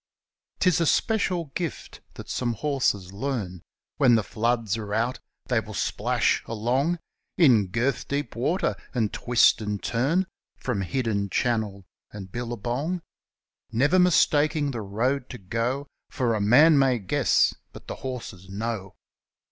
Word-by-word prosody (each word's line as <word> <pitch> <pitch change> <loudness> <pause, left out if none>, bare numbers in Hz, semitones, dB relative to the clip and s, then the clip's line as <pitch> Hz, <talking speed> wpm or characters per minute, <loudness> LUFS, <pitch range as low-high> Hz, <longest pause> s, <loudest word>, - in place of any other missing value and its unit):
Tis 180 -3 +3
a 165 - +2
trick, 220 +4 +2
no 170 -6 -3
doubt, 170 -3 -5 0.2
that - - -9
some 120 -2 -1
horses 110 -8 -1
leam; 100 -6 -3 0.4
When 130 -5 +5
the 110 - +2
floods 115 -1 0
are 105 -2 -4
out 115 +3 0 0.3
they 125 -3 +1
will 110 -1 -8
splash - - +1
along 125 +10 0 0.4
In 120 - +5
girth 120 +7 -1
deep 140 -5 -3
water, 160 +11 0 0.2
and 110 -4 0
twist 120 -2 +4
and 105 -1 -2
turn 145 +11 +1 0.3
From 115 -6 -2
hidden 100 -1 -1
channel 105 -4 -1 0.3
and 95 -3 -9
billabong, 120 - -3 0.7
Never 145 +11 +3
mistaking 155 -4 +3
the 120 -4 -4
road 120 +7 -1
to 125 - -7
go; 115 +7 -2 0.2
For 120 -3 0
a 110 - -1
man 145 +9 +6
may 130 -2 +3
guess 95 -5 +2
— - - -49
but - - -12
the - - -6
horses 115 -8 -7
know. 100 -1 -4
120 Hz, 145 wpm, -26 LUFS, 105-140 Hz, 0.7 s, man